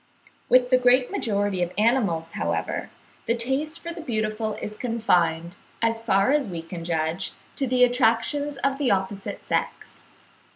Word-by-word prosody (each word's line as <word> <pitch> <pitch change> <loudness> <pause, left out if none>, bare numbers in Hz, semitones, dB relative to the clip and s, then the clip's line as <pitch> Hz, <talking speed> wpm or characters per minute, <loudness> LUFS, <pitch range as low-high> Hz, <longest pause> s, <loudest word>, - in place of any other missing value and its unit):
With 250 0 +4
the 255 - +6
great 250 0 +4
majority 205 -3 0
of 175 0 0
animals, 210 -8 +2
however, 85 - -2 0.4
the 230 - +2
taste 270 +7 -1
for 335 - -6
the 335 - -8
beautiful 215 -4 -2
is 210 - -6
confined, 175 -8 0 0.2
as 230 0 0
far 200 +2 +3
as 290 -4 +2
we 170 -4 -5
can 170 0 -7
judge, 165 +2 -2 0.2
to 270 - 0
the 250 0 +3
attractions 250 +4 +2
of 275 0 +1
the 275 -4 +1
opposite 195 0 -2
sex. - - -3
225 Hz, 155 wpm, -25 LUFS, 185-255 Hz, 0.4 s, the